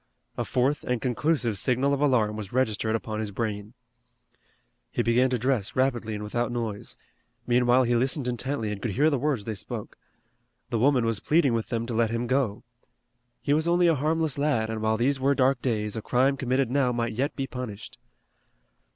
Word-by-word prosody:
A - - -1
fourth 135 +3 0
and 125 -1 -1
conclusive 125 -3 0
signal 130 +5 +1
of 140 - -1
alarm 115 -7 +2
was 105 -3 -6
registered 110 -3 0
upon 110 -1 -4
his 110 -1 -2
brain. 105 +1 -4 1.1
He - - -1
began 125 +3 +3
to 125 - 0
dress 120 -4 -1
rapidly 120 -4 0
and 105 - -5
without 120 +3 -2
noise. 115 -4 -4 0.5
Meanwhile 125 +1 +4
he 120 0 +1
listened 130 +2 0
intently 125 -2 -2
and 100 -1 -5
could 115 - -2
hear 150 +7 +3
the 140 - +1
words 135 -6 -1
they 110 - -3
spoke. 100 - -8 0.7
The 115 - 0
woman 130 -1 +3
was 115 -3 -1
pleading 150 -5 +2
with 115 -1 -2
them 115 -1 -1
to 120 - -4
let 115 0 +2
him 115 +1 -2
go. 125 -4 0 0.8
He 145 - +2
was 155 +2 +1
only 175 +1 +3
a 170 - +5
harmless 155 0 0
lad, 115 -7 +1
and 110 -1 -4
while 110 0 +1
these 135 +4 +1
were 140 +2 +2
dark 130 -1 +2
days, 105 -4 -1
a 110 - -3
crime 130 +5 +2
committed 130 -1 0
now 135 -2 +2
might 120 -1 -1
yet 135 +6 -1
be 135 - -2
punished. 125 -6 -7
125 Hz, 195 wpm, -26 LUFS, 110-135 Hz, 1.1 s, a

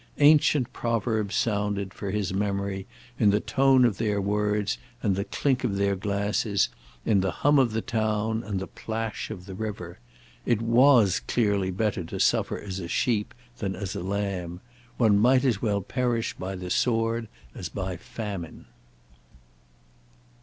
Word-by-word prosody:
Ancient 145 -3 +4
proverbs 110 -2 -1
sounded, 100 -3 0
for 100 - -5
his 100 -2 -1
memory, 100 -1 -2 0.3
in 105 - +5
the 100 +1 +3
tone 130 +4 +4
of 110 -5 0
their 105 -3 +1
words 105 +1 0 0.2
and 100 -3 +2
the 100 +1 -2
clink 135 0 0
of 110 -6 0
their 100 0 +1
glasses, 100 +1 0 0.4
in 105 -3 +3
the 95 - 0 0.2
hum 145 0 +6
of 125 -4 +3
the 110 0 -2
town 110 -1 0
and 100 -3 -3
the 95 - -4
plash 115 0 -4
of 90 0 -7
the 95 - -8
river. 95 - -6 0.4
It 120 -3 +1
was 115 -3 +5
clearly 100 -5 +1
better 95 0 -1
to - - -6
suffer - - +2
as 95 -2 -5
a 85 - -5
sheep 105 +4 0 0.2
than 95 -2 -2
as 95 0 -5
a - - -3
lamb. 95 -2 -3 0.4
One 105 -4 +4
might 130 +4 +4
as 115 -6 +1
well 105 -3 +1
perish 120 0 -1
by 95 +1 -5
the 90 -1 -6
sword 115 +1 +1 0.3
as 90 - -6
by 95 0 -4
famine. 95 -1 -7
105 Hz, 160 wpm, -26 LUFS, 95-115 Hz, 0.4 s, hum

